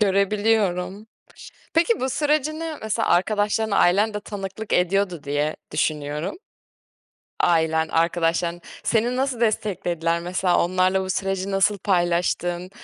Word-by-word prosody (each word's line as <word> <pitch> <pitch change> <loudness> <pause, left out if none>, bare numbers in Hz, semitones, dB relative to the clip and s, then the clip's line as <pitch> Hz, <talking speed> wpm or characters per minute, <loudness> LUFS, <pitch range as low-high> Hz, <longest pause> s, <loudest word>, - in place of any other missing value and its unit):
görebiliyorum. 200 -1 +1 0.7
Peki, 335 +7 +3
bu 260 - -1
sürecini 310 +3 -1
mesela 220 -1 -1
arkadaşlarına, 210 +3 +1
ailen 205 +5 +3
de 210 - -3
tanıklık 205 +1 -6
ediyordu 180 -2 +1
diye 145 +2 -1 0.2
düşünüyorum 150 +3 -2 1.1
Ailen, 160 -1 +2
arkadaşların 170 +1 0 0.2
seni 235 +2 +1
nasıl 260 -2 -1
desteklediler? 175 -6 0
Mesela 180 0 +1
onlarla 185 +2 +2
bu 190 - -4
süreci 195 +1 -2
nasıl 195 +1 +2
paylaştın? 175 -1 0
190 Hz, 110 wpm, -23 LUFS, 175-215 Hz, 1.1 s, Peki